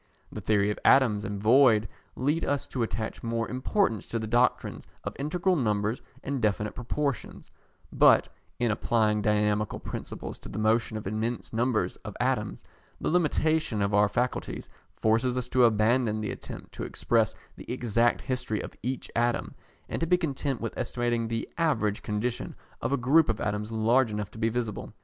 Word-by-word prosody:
The - - -6
theory 105 -1 +2
of - - -5
atoms 115 -7 +5
and 105 -2 -4
void 110 -1 +5 0.3
leads 150 +5 0
us 145 0 0
to 125 - -3
attach 110 -1 -3
more 115 0 -1
importance 130 - 0
to 115 - -2
the 110 - -3
doctrines 120 +3 +1 0.2
of - - -5
integral 175 +6 +1
numbers 105 -4 0 0.2
and 140 -2 -2
definite 105 -1 0
proportions; 140 +2 -3 0.4
but, - - +6 0.3
in 120 -2 +1
applying 105 -1 +1
dynamical 105 0 +1
principles - - -6
to - - -10
the - - -6
motion 110 +1 +1
of 110 - -7
immense 110 +5 -3
numbers 120 0 0
of - - -9
atoms, - - -1 0.4
the - - -1
limitation 155 -6 +1
of 100 +1 0
our 105 0 +5
faculties 125 +3 -2 0.3
forces 115 +3 +1
us 125 -1 -2
to 125 -1 +5
abandon 110 0 +2
the 105 - -2
attempt - - -9
to - - -6
express - - +1 0.2
the - - -8
exact 120 -1 +1
history 125 -5 -2
of - - -6
each 125 +3 -4
atom, 120 0 0 0.3
and - - -3
to 165 - 0
be 180 +2 +4
content 140 -5 -2
with 115 - -4
estimating 120 -1 -1
the 115 0 -3
average 115 -11 +1
condition 110 +3 -3 0.3
of - - -1
a 140 - +2
group 140 +6 +4
of 110 - 0
atoms 105 +1 -2
large 115 +3 +3
enough 105 -1 -4
to 110 - -11
be 115 0 +2
visible. 115 -3 -4
115 Hz, 175 wpm, -28 LUFS, 110-130 Hz, 0.4 s, but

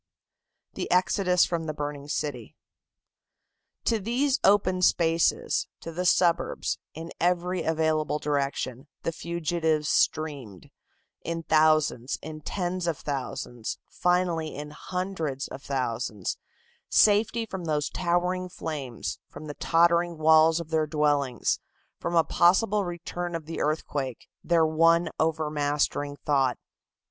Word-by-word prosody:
THE - - -4
EXODUS 180 0 +3
FROM 170 -3 -3
THE 155 - -3
BURNING 145 -1 -5
CITY. 140 -6 -4 1.3
To 225 - +2
these 255 +7 +1
open 185 -2 +3
spaces, 165 -2 +2
to 165 - -6
the 180 +2 -1
suburbs, 170 -1 +2 0.2
in 165 +2 -7
every 180 +1 +1
available 160 -2 +1
direction, 140 -2 -2 0.2
the 165 - 0
fugitives 160 -2 -1
streamed, 140 - -1 0.5
in 165 0 -4
thousands, 155 -5 +2
in 155 0 -7
tens 180 +2 -2
of 165 -3 0
thousands, 130 -4 -4
finally 175 -3 0
in 150 +1 -7
hundreds 165 -5 -3
of 135 - -9
thousands, 115 -7 -2 0.5
safety 220 +2 +4
from 190 -5 -6
those 150 -2 0
towering 180 +1 0
flames, 140 -9 -5
from 155 - -10
the 150 - -6
tottering 170 +2 +2
walls 160 +1 +5
of 165 -1 -8
their 155 -1 +1
dwellings, 145 -4 +1 0.4
from 170 - -2
a 165 - +6
possible 195 +5 +3
return 175 0 -4
of 165 -2 -5
the 165 +1 -5
earthquake, 145 -4 -2 0.2
their 170 -2 +3
one 165 +1 +3
overmastering 150 -2 0
thought. 135 -4 +2
160 Hz, 120 wpm, -27 LUFS, 145-175 Hz, 1.3 s, a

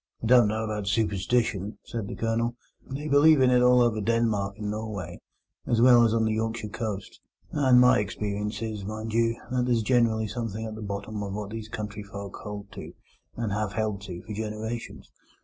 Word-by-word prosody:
"I - - -1
don't 120 -1 +6
know 110 +1 -1
about 105 -2 -3
superstition," 105 0 0
said 115 -4 -4
the - - -6
Colonel. 115 +1 -1 0.3
"They 140 +3 -4
believe 150 +1 +6
in 130 -1 +5
it 125 0 +5
all 125 0 +6
over 110 -2 +1
Denmark 105 -3 0
and 105 -1 -3
Norway, 105 -5 -5 0.5
as 115 - +2
well 120 0 +7
as 115 - +3
on 115 0 +2
the 110 - +1
Yorkshire 110 0 -2
coast; 105 -2 -5 0.3
and 130 -4 +5
my 125 -1 +6
experience 105 +1 -3
is, 110 -3 -4
mind 110 +2 -5
you, 115 0 +1
that 125 -1 +1
there's 120 -3 +2
generally 115 -2 +2
something 110 0 -4
at 110 - -5
the 110 - -8
bottom 100 +1 -4
of 100 -1 -4
what 105 -1 -5
these 110 -1 -6
country 105 -1 -5
folk 100 -1 -8
hold 105 -1 -8
to, - - -9 0.4
and 115 -3 -2
have 105 -1 -1
held 105 -2 -1
to 90 -2 -7
for 105 - -7
generations. 110 +2 -5
110 Hz, 195 wpm, -27 LUFS, 105-115 Hz, 0.5 s, well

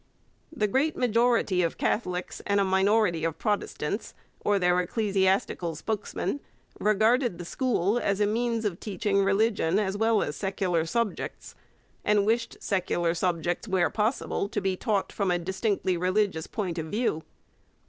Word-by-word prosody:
The 255 -10 0
great 270 +9 +1
majority 230 -5 +2
of 170 -2 -1
Catholics 180 -4 -2
and 200 0 +2
a - - +4
minority 190 -2 +2
of 165 -1 -1
Protestants, 205 -2 -2 0.3
or 205 -1 +3
their 180 -1 +3
ecclesiastical 190 -3 0
spokesmen, 215 - -3 0.4
regarded 220 +1 +2
the 175 - -7
school 230 -1 0
as 200 -4 0
a 210 - +4
means 230 +1 0
of 185 -4 -2
teaching 200 -1 0
religion 195 -3 +2
as 200 -2 0
well 220 0 +2
as 145 - -4
secular 185 -4 -1
subjects, 230 +2 -3 0.5
and 205 -1 +3
wished 230 +2 0
secular 175 -3 0
subjects, 175 +2 -1
where 185 -3 +2
possible, 215 -2 -1
to - - -1
be 190 -1 0
taught 205 -1 -1
from 200 -3 -1
a 175 - +2
distinctly 190 +1 -1
religious 185 -2 0
point 180 -6 -3
of 160 - -4
view. 210 -4 -1
200 Hz, 150 wpm, -27 LUFS, 180-220 Hz, 0.5 s, a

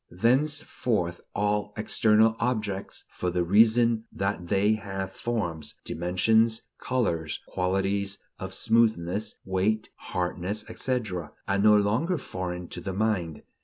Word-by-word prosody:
Thenceforth 120 - +1
all 105 0 0
external 110 +1 +4
objects, 105 -5 -2
for 90 - -2
the 90 0 0
reason 110 +4 +4
that 95 -2 -2
they 100 +3 +3
have 95 -3 -4
forms, 85 -11 -3
dimensions, 110 +7 +2 0.2
colors, 85 -12 -1
qualities 95 +2 0 0.2
of 95 0 -5
smoothness, 105 -2 +1
weight, 95 +3 0
hardness, 90 +4 -3
etc., 95 - -2
are 100 0 +1
no 105 +1 +6
longer 115 - +1
foreign 90 - -5
to - - -6
the 95 - -4
mind. 95 -7 -1
100 Hz, 115 wpm, -27 LUFS, 90-110 Hz, 0.2 s, no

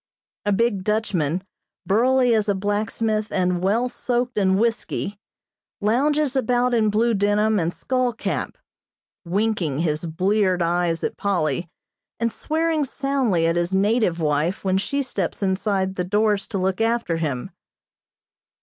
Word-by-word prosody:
A - - +3
big 205 -2 +1
Dutchman, 185 -6 0 0.4
burly 250 +4 +3
as 215 -2 +1
a 200 - +2
blacksmith 215 +2 -1
and 180 -2 0
well 215 +6 +2
soaked 245 0 -2
in 190 -2 +3
whiskey, 215 -2 -1 0.6
lounges 275 +6 +1
about 250 -1 +1
in 220 -2 +3
blue 225 +3 +2
denim 205 +1 +2
and 165 0 0
skull 255 +4 -1
cap, 225 - -3 0.7
winking 185 -5 0
his 155 0 -1
bleared 185 +2 +1
eyes 170 -1 0
at - - -2
Polly 170 -4 -1 0.5
and 230 0 0
swearing 320 +2 0
soundly 265 -10 0
at 165 +1 +1
his 175 +2 0
native 200 -3 +2
wife 155 +3 0
when 190 -1 +1
she 280 +8 -1
steps 200 -6 -3
inside 190 0 0
the 180 - -2
doors 205 +2 +1
to - - -3
look 190 +2 0
after 225 -7 +1
him. 140 -7 -3
205 Hz, 140 wpm, -23 LUFS, 180-230 Hz, 0.7 s, A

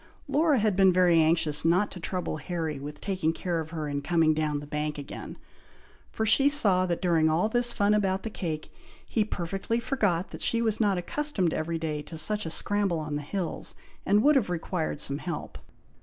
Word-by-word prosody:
Laura 300 -1 +3
had 215 -3 +1
been 190 -1 +5
very 175 -2 +4
anxious 155 -2 +1
not 180 +5 +2
to 180 - -8
trouble 180 -2 -3
Harry 160 -1 -4
with 145 +1 -8
taking 185 -5 -1
care 170 0 -2
of 160 -1 -5
her 155 -2 -4
in 145 -1 -3
coming 160 +1 +2
down 155 -1 -1
the 145 - -9
bank 150 +1 -3
again; 145 -1 -8 0.7
for 220 - -2
she 270 +6 +6
saw 200 -11 +4
that 170 0 -2
during 165 -3 +3
all 165 +6 +2
this 240 +2 +2
fun 205 -2 +2
about 195 -2 0
the 225 - -3
cake, 155 -6 -5 0.3
he 220 - 0
perfectly 195 +3 -3
forgot 205 -8 0
that - - -9
she 230 - +2
was 220 -2 0
not 200 -3 +2
accustomed 190 - -1
every 165 +1 -2
day 155 -2 -3
to 160 +2 -9
such 210 +4 +2
a - - -3
scramble 200 +1 0
on 150 -1 -4
the 145 - -2
hills, 175 +4 -5 0.3
and 205 +2 +3
would 300 +1 +5
have 245 -9 +2
required 165 -3 -3
some 140 +1 -3
help. 170 -3 -6
175 Hz, 200 wpm, -27 LUFS, 155-205 Hz, 0.7 s, she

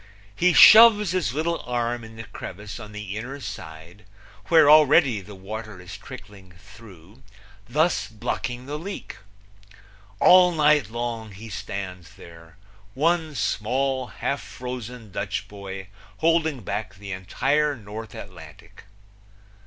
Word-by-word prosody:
He 180 +1 +3
shoves 210 +2 +8
his 180 -10 0
little 165 +2 -1
arm 120 -1 -2
in 110 0 -12
the 115 - -8
crevice 105 +1 -9
on 105 -2 -10
the 105 -2 -7
inner 130 +6 -6
side, 90 - -10 0.4
where 160 -3 +6
already 150 -6 +5
the 100 +2 -12
water 105 +1 -8
is 90 -1 -10
trickling 95 -3 -12
through, 100 +1 -16 0.5
thus 155 +7 +1
blocking 120 +3 -4
the 145 +2 -5
leak. 195 +5 -7 1.0
All 180 -1 +7
night 150 -6 +3
long 115 -1 -4
he 110 +4 -10
stands 95 -1 -7
there, 85 -2 -15 0.4
one 160 +1 0
small, 130 +3 -1
half 100 - -3
frozen 125 -3 -8
Dutch 100 +1 -4
boy 95 -1 -9 0.3
holding 160 -4 +1
back 100 0 -5
the 100 0 -9
entire 140 +11 0
North 110 -1 -9
Atlantic. - - -12
115 Hz, 125 wpm, -24 LUFS, 100-145 Hz, 1.0 s, shoves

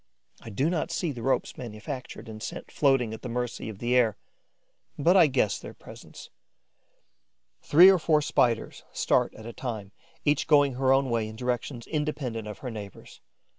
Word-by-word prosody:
I - - -9
do 130 +8 0
not 170 -2 -1
see 170 -4 -2
the 120 -4 -7
ropes 135 +3 -1
manufactured 120 0 -7
and 110 -1 -9
sent - - -7
floating 135 -6 +2
at 110 - -8
the 125 - -6
mercy 120 -1 -3
of 105 - -8
the 120 +3 0
air; 115 -5 +3 0.8
but 170 +6 +3
I 175 -5 +7
guess 130 -7 +1
their - - -10
presence. - - -13 1.3
Three 170 +5 +7
or 190 - +3
four 155 -2 +2
Spiders 115 -5 0
start - - +1
at 110 - -11
a 115 - -7
time, 110 -7 -5 0.3
each 145 -1 +2
going 145 -3 +4
her 130 +1 +1
own 135 -1 +3
way 115 -2 0
in 110 - -9
directions 125 0 -3
independent 140 -8 -3
of 105 -2 -7
her 125 - -3
neighbours'. 105 -3 -10
125 Hz, 175 wpm, -27 LUFS, 110-145 Hz, 1.3 s, I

